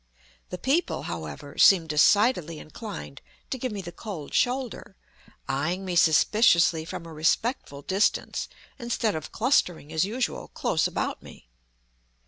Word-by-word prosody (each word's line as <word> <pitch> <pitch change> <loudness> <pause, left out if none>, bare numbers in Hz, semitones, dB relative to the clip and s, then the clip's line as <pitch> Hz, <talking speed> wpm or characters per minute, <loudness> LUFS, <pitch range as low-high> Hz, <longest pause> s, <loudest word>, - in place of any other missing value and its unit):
The 180 - -5
people, 285 - 0
however, - - -7
seem 185 -4 +7
decidedly 170 - +3
inclined 160 - -8 0.3
to 260 - -3
give 255 0 -3
me 200 -2 -5
the 175 - -7
cold 175 -8 -8
shoulder, 250 -5 -1 0.5
eying 170 +8 -2
me 180 -1 -3
suspiciously 170 0 +4
from 170 - -7
a 165 - -10
respectful 155 - -1
distance, 195 +6 0 0.3
instead 235 -3 -1
of 155 -2 -6
clustering, 180 - +1
as 160 - +2
usual, 230 +6 -2
close - - 0
about - - -3
me. - - -15
185 Hz, 130 wpm, -26 LUFS, 160-230 Hz, 0.5 s, seem